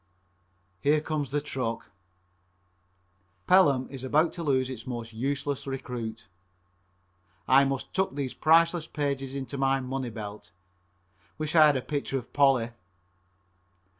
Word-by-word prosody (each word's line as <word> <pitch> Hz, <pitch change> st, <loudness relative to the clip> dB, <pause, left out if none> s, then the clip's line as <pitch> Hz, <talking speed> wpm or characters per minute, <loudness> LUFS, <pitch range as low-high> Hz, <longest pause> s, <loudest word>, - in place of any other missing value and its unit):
Here 150 Hz, +6 st, +3 dB
comes 150 Hz, -3 st, -3 dB
the 145 Hz, -, 0 dB
truck. 125 Hz, -5 st, -4 dB, 1.5 s
Pelham 145 Hz, -9 st, +4 dB
is 135 Hz, -2 st, -8 dB
about 155 Hz, +5 st, +2 dB
to 170 Hz, -, -6 dB
lose 130 Hz, -5 st, +1 dB
its 125 Hz, -3 st, -8 dB
most 120 Hz, -2 st, -5 dB
useless 140 Hz, +4 st, -2 dB
recruit. 120 Hz, -4 st, -5 dB, 1.2 s
I 135 Hz, +2 st, +6 dB
must 135 Hz, -1 st, -3 dB
tuck 190 Hz, -7 st, 0 dB
these 140 Hz, -3 st, -3 dB
priceless 165 Hz, +1 st, +3 dB
pages 140 Hz, -2 st, -3 dB
in 135 Hz, -1 st, -3 dB
my 135 Hz, 0 st, +2 dB
money 130 Hz, -1 st, -3 dB
belt. 105 Hz, -2 st, -8 dB, 0.9 s
Wish 155 Hz, +1 st, -3 dB
I 155 Hz, -2 st, +8 dB
had 145 Hz, -2 st, +3 dB
a 130 Hz, -, -4 dB
picture 140 Hz, -2 st, -2 dB
of 125 Hz, -2 st, -8 dB
Polly. 135 Hz, -5 st, +3 dB
135 Hz, 130 wpm, -28 LUFS, 125-145 Hz, 1.5 s, I